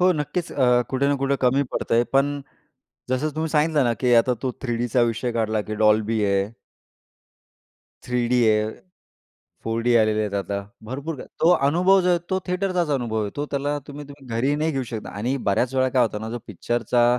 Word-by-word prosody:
हो. 185 +1 +5
नक्कीच 160 +2 -3
अ, 125 -3 +3
कुठे 135 +1 +1
ना 145 - +2
कुठे 140 0 +1
कमी 130 +3 +3
पडतय 115 +1 +1
पण, 140 +1 +2 0.7
जसं 135 +4 0
तुम्ही 160 - -1
सांगितलं 150 -2 +2
ना 120 - +1
की 125 -1 +4
आता 125 - 0
तो 130 -2 -1
3 120 -3 -1
डीचा 120 +1 +1
विषय 120 +2 -3
काढला 110 -2 0
की - - -1
डॉल्बी 110 0 +3
आहे. 100 0 +1 1.5
3 125 -1 -1
डी 125 0 +3
आहे, 105 0 +2 1.0
4 115 +1 -1
डी 120 0 +3
आलेले 110 -1 +2
आहेत 105 -2 -3
आता. 100 0 -2 0.2
भरपूर 140 +7 -5
काही - - -9
तो 165 - +6 0.2
अनुभव 180 +6 +4
जो 180 - +1
आहे 175 -1 +3
तो 190 - +2
थिएटरचा 180 -4 0
अनुभव 115 -5 -1
येतो 145 +9 -4
त्याला 145 +1 -1
तुम्ही 145 0 -8
तुम्ही 140 -1 -13
घरी 135 +5 +1
नाही 155 +2 0
घेऊ 135 -3 -2
शकता 110 -2 -5
आणि 120 +6 -1
बऱ्याच 120 +6 +1
वेळा 130 0 +2
काय 130 0 +2
होतं 105 -2 -3
ना 110 - -5
जो 120 - -4
पिक्चरचा 120 +4 0
125 Hz, 195 wpm, -23 LUFS, 115-145 Hz, 1.5 s, तो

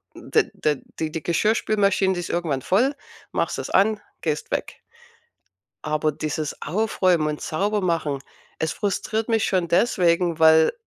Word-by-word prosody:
D - - 0
d 150 -3 -1 0.2
die 160 -1 -2
die 160 -3 -5
Geschirrspülmaschine, 200 +1 +2
die 180 - -3
ist 175 - -5
irgendwann 160 -6 -1
voll, 250 - +2 0.4
machst - - -1
das - - -5
an, 205 +2 +3 0.2
gehst 150 -2 -2
weg. - - -3 1.0
Aber 155 0 0
dieses 155 0 -4
Aufräumen 185 -3 +1
und 150 0 -3
sauber 205 +5 -1
machen, 160 -6 -1 0.4
es 160 -1 -1
frustriert 215 +2 -2
mich 225 -2 +2
schon 180 -3 +1
deswegen, 175 -4 +2
weil, 160 0 +6
170 Hz, 145 wpm, -23 LUFS, 155-200 Hz, 1.0 s, weil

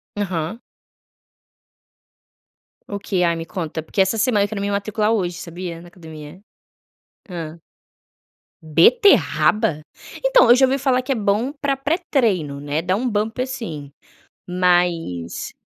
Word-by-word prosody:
Aham. 190 0 -3 2.3
O 205 - -4
quê? 195 -2 -2
Ai, 170 -1 +2
me 165 - -5
conta, 160 -3 -5
porque 195 - -6
essa 190 +4 +3
semana 215 -3 +2
quero 205 -1 -5
me 200 0 -1
matricular 210 +1 0
hoje, 180 -6 -1
sabia, 170 0 -7
na 175 - -13
academia. 160 -1 -12 0.9
Hã. 165 -2 -7 1.0
Beterraba? 195 - +3 0.4
Então - - +5
eu 240 - +9
já 265 +1 +5
ouvi 265 +1 0
falar 255 -1 +2
que 255 - -4
é - - +2
bom 215 +5 0
pra 280 -2 -2
pré-treino, 255 - 0
né. 145 +2 -2
Dá 185 +2 0
um 245 +5 -1
bump, 220 +2 -2
assim. 225 - -5 0.6
Mas 175 - 0
195 Hz, 130 wpm, -21 LUFS, 165-230 Hz, 2.3 s, eu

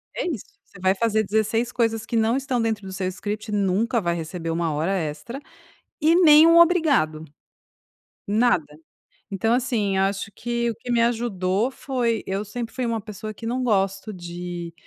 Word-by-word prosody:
É - - -2
isso, 285 - -4 0.2
você 180 - -17
vai 190 +1 +3
fazer 220 +1 +1
16 220 +3 0
coisas 225 -3 0
que 230 - -4
não 225 +2 +2
estão 260 -3 -1
dentro 220 -3 -1
do 190 - -7
seu 185 -1 -2
script, 205 +3 -5
nunca 205 +4 +1
vai 170 -4 -1
receber 165 0 -4
1 165 0 -1
hora 155 +5 -1
extra 170 - -4 0.6
e 315 +2 +4
nem 315 -3 +8
um 335 0 +7
obrigado, 300 - +3 1.0
nada. 200 -9 +1 0.5
Então 225 +3 0
assim, 235 -6 0
acho 195 +2 -1
que 235 0 -2
o 225 - -3
que 245 +3 -6
me 235 -1 +3
ajudou 225 -2 0
foi 245 -4 -2
eu 195 +2 -3
sempre 235 +3 -6
fui 255 -1 -2
uma 230 -1 -1
pessoa 215 0 -7
que 225 - -10
não 250 +3 -1
gosta 195 -2 0
de, 175 -1 -7
215 Hz, 175 wpm, -23 LUFS, 190-240 Hz, 1.0 s, nem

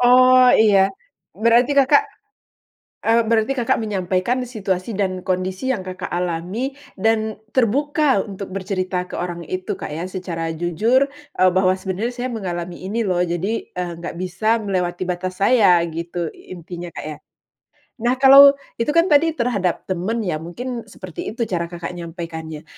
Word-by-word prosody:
Oh, 255 +1 +6
iya. 200 -3 +5 0.5
Berarti 235 +5 +3
Kakak, 280 +9 +5 1.0
eee, 230 +1 +4
berarti 230 +3 +2
Kakak 240 -2 +1
menyampaikan 195 +2 -1
situasi 205 -4 -3
dan 185 -2 -1
kondisi 185 +6 -2
yang 205 -7 -3
Kakak 185 0 -6
alami 180 +9 -2 0.3
dan 220 +1 +1 0.2
terbuka 275 0 +2
untuk 195 -2 -7
bercerita 185 -1 -2
ke - - -9
orang 175 -1 -4
itu, 185 0 -3
Kak, - - -6
ya 165 +3 -4
secara 170 -3 -4
jujur, 210 - +2 0.3
eee, 185 0 +5
bahwa, 185 0 +3
"Sebenarnya 190 +6 -3
saya 250 0 -3
mengalami 175 -4 -5
ini 225 +3 -1
loh 180 -2 0
jadi, 180 +5 -1 0.2
eee, 180 -1 -4
nggak 170 0 -6
bisa 215 +5 0
melewati 185 -3 -2
batas 185 +1 -3
saya," 200 -6 +5
gitu 170 +1 -4
intinya 175 0 -9
Kak - - -7
ya. 155 -1 -6 0.8
Nah 240 +3 +1
kalau 275 +1 +8 0.2
itu 230 - 0
kan 335 +1 +4
tadi 320 +2 +4
terhadap 205 - -1
teman 195 +5 -2
ya 155 -5 -2
mungkin 230 +8 -6
seperti 185 -4 -8
itu 235 - -1
cara 170 -5 -2
Kakak 170 -1 -6
nyampaikannya. 165 -3 -7
190 Hz, 150 wpm, -21 LUFS, 175-235 Hz, 1.0 s, kalau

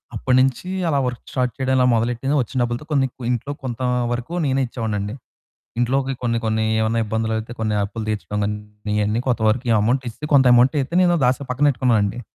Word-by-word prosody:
అప్పటినుంచి 130 +5 +1 0.2
అలా 145 - +1
work 125 -1 -3
start 125 -2 0
చేయడం 130 -1 +1
మొదలెట్టింది. 120 +5 0
వచ్చిన 125 +3 -5
డబ్బులతో 120 +4 -2
కొన్ని 135 -2 +2
కు 130 - -16
ఇంట్లో 125 +4 -2
కొంత 125 0 -5 0.3
వరకు 120 +7 -4
నేనే 135 0 +1
ఇచ్చేవాడిని 110 -3 -3
అండి. 100 +2 -4 0.7
ఇంట్లోకి 135 +2 +1
కొన్ని 115 -1 0
కొన్ని 110 0 0 0.2
ఏమన్నా 115 +1 +1
ఇబ్బందులు 110 +1 -2
అయితే, 115 +2 -7
కొన్ని 110 -1 0
అప్పులు 110 +2 -5
తీర్చడం 105 -1 -3
గాని, 105 +1 -1 0.4
ఇయన్నీ 105 +2 +1
కొంత 120 -3 +1
వరకు 120 +2 +1
అమౌంట్ 125 +5 +1
ఇస్ 115 - -10 0.2
కొంత 135 - +6
అమౌంటైతే 135 +5 +3
నేను 175 -1 +3
దాసి 125 +3 +1
పక్కనెట్టుకున్నానండి. 125 -5 +1
120 Hz, 175 wpm, -21 LUFS, 110-130 Hz, 0.7 s, కొంత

